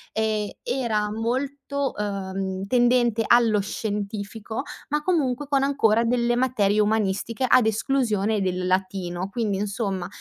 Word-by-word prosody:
e 215 -1 -1
era 215 -5 -1
molto, 270 +5 -2
uhm, 195 -1 -3
tendente 240 -1 +3
allo 230 -3 +4
scientifico 210 +2 -4 0.3
ma 300 +1 0
comunque 290 -6 0
con 275 -1 +2
ancora 235 -5 +3
delle 240 0 +1
materie 220 -5 +2
umanistiche 215 +3 0
ad 245 - +6
esclusione 220 -2 +1
del 185 -1 -1
latino. 185 -1 -1
Quindi 215 -4 -1
insomma, 200 -2 -2
220 Hz, 120 wpm, -24 LUFS, 200-245 Hz, 0.3 s, ad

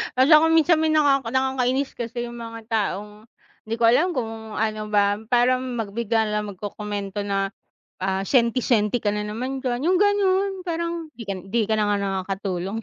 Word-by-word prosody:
Hala 265 +5 +5
ako 325 - +3
minsan 325 0 +4
may 320 - +2
nakaka 280 -5 +3
nakakainis 265 0 0
kasi 240 0 -5
yung 240 0 -9
mga 230 0 -7
taong, 210 0 -2 0.4
di 225 - -1
ko 235 - -3
alam 320 +8 +3
kung 225 -2 -5
ano 215 -1 -2
ba, 205 0 +2
parang 255 +1 +2
mag 220 -4 -3
bigla 225 0 0
na - - -3
lang 205 -2 -6
magkokomento 205 0 -5
na, 195 0 -1 0.5
ah, 190 0 -1
senti 240 -1 +3
senti 225 -1 +2
ka 210 -1 -1
na 210 - -2
naman 255 +6 -4
diyan 250 +3 -1
yung 365 0 +3
ganun, 400 -1 +2 0.2
parang 335 -1 -3
di 230 - -9
ka 200 - -3
di 225 +3 +1
ka 220 - +2
na 210 - +2
nga - - +1
nakakatulong. 195 +1 -3
230 Hz, 185 wpm, -23 LUFS, 210-265 Hz, 0.5 s, Hala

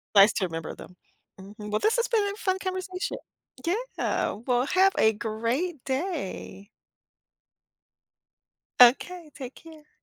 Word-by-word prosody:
nice 200 +2 +8
to 195 - 0
remember 165 -2 -4
them. 180 - -13 0.4
Mhm, 210 +2 -9
well, 210 - +1
this 440 - +2
has 475 - +1
been 450 -3 +2
a 405 - -9
fun 380 -3 0
conversation, 370 0 -4 0.5
yeah, 450 +9 -1
well, 250 0 +2
have 380 +5 +4
a 220 - +5
great 235 - -2
day. 265 - -4 2.1
Okay, 305 +7 +5
take 260 -2 -8
care. 315 -2 -15
280 Hz, 125 wpm, -27 LUFS, -, 2.1 s, nice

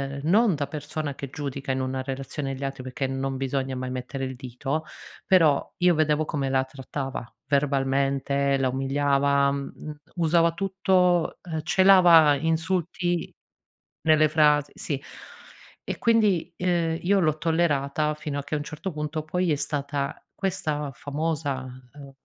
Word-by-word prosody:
ehm, 140 - -6
non 200 +2 +4
da 145 -1 -2
persona 150 0 -4
che 140 - -7
giudica 140 -2 -4
in 130 - -1
una 130 0 -2
relazione 135 +1 -4
gli 140 - -7
altri, 135 -1 -4
perché 130 +1 -3
non 135 0 -3
bisogna 135 0 -2
mai 130 0 -4
mettere 130 +1 -4
il 130 0 -5
dito, 135 +4 -4 0.4
però 165 -8 +3
io 180 0 +4
vedevo 155 0 +2
come 140 -3 -2
la 130 0 +2
trattava, 135 -1 -5 0.2
verbalmente, 140 0 +1
la 130 -1 +1
umiliava, 140 +1 +2
mhmm, 140 0 -4 0.2
m 150 - -6 0.2
usava 165 0 +3
tutto, 185 -2 +1
ehm, 160 -3 -4
celava 175 -4 +6
insulti 170 +2 -1 0.7
nelle 155 -1 +4
frasi 150 -2 +3
sì. 140 -2 -4 0.8
E - - -4
quindi, 210 -7 +2
ehm, 170 -3 0
io 195 +2 +3
l'ho 155 -3 +1
tollerata 150 -2 +1
fino 145 -2 -4
a - - -5
che 150 - -3
a - - +1
un 145 - -4
certo 165 +5 -6
punto 150 0 -4
poi 180 +1 0
è - - +3
stata 140 -1 -3
questa 155 -7 -2
famosa, 145 -1 -3 0.3
ehm, 140 -2 -11
145 Hz, 150 wpm, -25 LUFS, 135-165 Hz, 0.8 s, celava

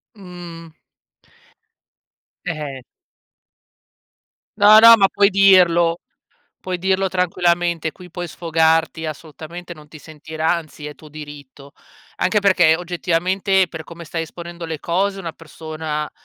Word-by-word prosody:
Mhmm. 175 -4 -11 1.7
E - - 0
eh. 145 -4 -7 1.8
No, 210 +1 +8
no, 230 +1 +9
ma 195 -3 +3
puoi 200 0 +3
dirlo. 180 -4 +4 0.6
Puoi 185 -1 -4
dirlo 190 +1 0
tranquillamente, 175 -3 0
qui 180 -1 -14
puoi 175 +1 -6
sfogarti 160 -1 0
assolutamente, 160 +3 -9
non 155 -3 -14
ti 155 - -13
sentirà 155 +1 -3
anzi 155 -2 -10
è 150 - -8
tuo 155 - -15
diritto. 145 -2 -12 0.4
Anche 210 +3 +1
perché, 180 -5 +4
oggettivamente, 180 +2 0
per 160 -2 -8
come 170 +1 -11
stai 165 +1 -4
esponendo 170 +1 -9
le 160 -1 -5
cose, 195 +3 -1
una 170 -3 -6
persona, 155 -1 -6
170 Hz, 120 wpm, -20 LUFS, 155-185 Hz, 1.8 s, no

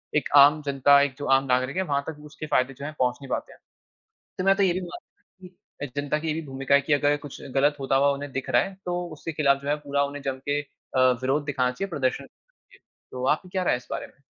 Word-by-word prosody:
एक 150 - +1
आम 145 +2 +7
जनता 140 0 +5
एक 140 -2 0
जो 145 - -5
आम 135 +1 +1
नागरिक 130 +1 0
है - - +2
वहाँ 140 0 +1
तक 160 -2 -6
उसके 150 +1 -8
फायदे 130 +1 +2
जो 140 - -9
है 155 - -4
पहुँच 125 -1 +1
नहीं 135 - -10
पाते - - -3
हैं। - - -21 0.8
तो 185 - -2
मैं 195 +1 +4
तो 200 - +2
ये 180 -3 +3
भी 185 - -3
मानता 180 +1 -12
कि 180 -6 -11
जनता 145 +1 -1
की 160 - -5
ये 155 - +1
भी 160 - -3
भूमिका 135 +1 +1
है 140 - +4
की 145 +2 0
अगर 145 +1 +2
कुछ 145 - -9
गलत 145 +2 +3
होता 135 0 0
हुआ 140 - +4
उन्हें 140 0 -6
दिख 135 0 -4
रहा - - +4
है 195 - -5
तो 175 0 -2 0.2
उसके 165 - -5
खिलाफ 140 -1 +3
जो 140 - -8
है 145 - +3
पूरा 140 0 +1
उन्हें 140 0 -5
जम 135 -1 -2
के 145 - +2
अ, 135 -2 -7 0.2
विरोध 135 +3 0
दिखाना 130 -3 0
चाहिए। 195 +10 -5
प्रदर्शन 135 -7 -1
क - - -17 0.5
इ - - -20 0.3
तो 125 0 -4
आपकी 180 +4 0
क्या 185 0 -1
राय - - +2
है - - +1
इस 125 - -15
बारे - - -4
में? - - -24
145 Hz, 275 wpm, -25 LUFS, 135-155 Hz, 0.8 s, आम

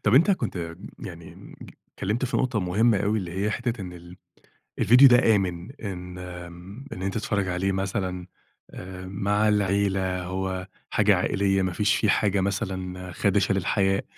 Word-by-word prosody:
طب 105 - +3
أنت 165 +9 +6
كنت 85 - -2 0.2
يعني 85 -2 -10 0.4
اتكلّمت 110 +7 -1
في 130 - -1
نقطة 125 -5 0
مهمّة 105 +5 +2
أوي 105 +2 +1
اللي 90 -4 -5
هي 105 - +1
حتّة 120 0 -2
إن 90 -2 -6
ال 90 +1 -12 0.6
الڤيديو 125 +4 +8
ده 120 -3 +5
آمن، 90 +1 -3
إن 90 -7 -7 0.7
إن 95 - -6
أنت 95 0 -2
تتفرّج 100 -2 -1
عليه 90 +2 0
مثلًا 95 -2 -2 0.8
مع 100 +3 0
العيلة 95 -2 +1
هو 95 0 -3 0.2
حاجة - - +4
عائليّة 95 -1 +1
ما 95 -1 -1
فيش 105 +3 +2
فيه 105 - +1
حاجة 100 -2 +2
مثلًا 95 -2 -3
خادشة 100 +1 +2
للحياء 95 +1 +1
95 Hz, 150 wpm, -25 LUFS, 90-105 Hz, 0.8 s, الڤيديو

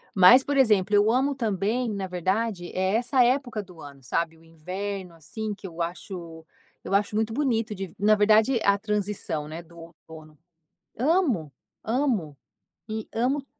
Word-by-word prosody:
Mas 220 +8 +8
por 285 0 -1
exemplo 210 -6 +3
eu 205 +2 +4
amo 270 +3 +1
também 225 +1 -1
na 200 -3 -3
verdade 185 +1 -1
é 190 +2 0
essa 245 +2 +3
época 245 -3 0
do 180 -3 -16
ano 140 -1 -12
sabe, 165 +5 -2
o 160 - -22
inverno 180 +3 -6
assim 205 +8 -5
que 200 -1 -9
eu 170 -1 -7
acho 170 -1 -6 0.4
eu - - -5
acho 205 +1 +1
muito 220 +1 0
bonito 230 -5 0
de 190 -3 -6
na 210 +2 +5
verdade 215 +4 +4
a 200 0 +4
transição, 205 -7 -2
né, 160 +2 -7
do 170 0 -18
outono. 160 -2 -14 0.6
Amo, 260 - +1 0.3
amo, 225 - 0 0.5
e 220 0 -4
amo 265 +5 0
205 Hz, 160 wpm, -26 LUFS, 170-230 Hz, 0.6 s, Mas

